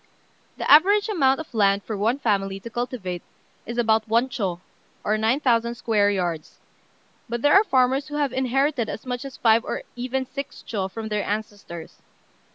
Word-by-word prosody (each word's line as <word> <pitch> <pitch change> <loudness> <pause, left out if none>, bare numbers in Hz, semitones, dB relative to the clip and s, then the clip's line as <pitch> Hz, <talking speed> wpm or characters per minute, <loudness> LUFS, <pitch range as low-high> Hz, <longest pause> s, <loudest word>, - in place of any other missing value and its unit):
The - - -3
average 405 +8 +6
amount 270 -9 +2
of 320 - -8
land 200 -2 +3
for 220 - -4
one 220 +6 +1
family 195 -6 0
to 230 - -9
cultivate 225 -8 -4 0.5
is 235 +1 -5
about 225 -2 +2
one 235 +4 +2
chô, 190 -8 -2 0.4
or 215 - +1
9,000 235 +1 +1
square 215 -4 +2
yards; 175 -5 -3 0.7
but 235 0 -3
there 290 - +5
are 395 - +7
farmers 265 -5 +2
who 295 - -6
have 285 -4 0
inherited 265 -1 0
as 220 - -6
much 250 -1 -3
as 270 - -8
five 225 0 +4
or - - -4
even 255 +2 -2
six 275 +2 -7
chô 195 -4 -2
from 220 +2 -6
their 210 -1 -1
ancestors. 205 -5 -6
235 Hz, 170 wpm, -24 LUFS, 210-265 Hz, 0.7 s, are